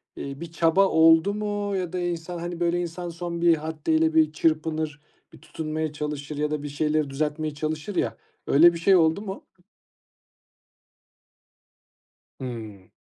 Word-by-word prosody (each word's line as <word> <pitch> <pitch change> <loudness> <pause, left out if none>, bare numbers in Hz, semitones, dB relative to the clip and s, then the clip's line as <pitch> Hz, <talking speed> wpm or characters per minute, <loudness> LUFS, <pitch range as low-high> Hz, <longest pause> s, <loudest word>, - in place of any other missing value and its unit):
iii, 140 +2 -7
bir 170 -1 -7
çaba 170 +4 +3
oldu 165 +4 +5
mu 205 -1 -2
ya 180 -2 -3
da 180 - -1
insan, 175 0 -3
hani, 175 0 -5
böyle, 175 0 +1
insan 175 +1 -5
son 170 0 -5
bir 170 -1 +5
haddeyle 160 +1 0
bir 155 -1 +4
çırpınır, 155 -1 -1 0.3
bir - - -13
tutunmaya 155 -1 -4
çalışır 150 0 -5
ya 150 0 -1
da 150 -1 -2
bir 145 - -4
şeyleri 150 0 0
düzeltmeye 150 +2 -2
çalışır 155 +6 -4
ya - - -1 0.3
öyle 170 +5 +6
bir 170 - -5
şey 190 +3 +5
oldu 160 +3 +3
mu? 195 -2 -7 3.0
Hımm. 110 -7 -7
160 Hz, 145 wpm, -25 LUFS, 150-175 Hz, 3.0 s, öyle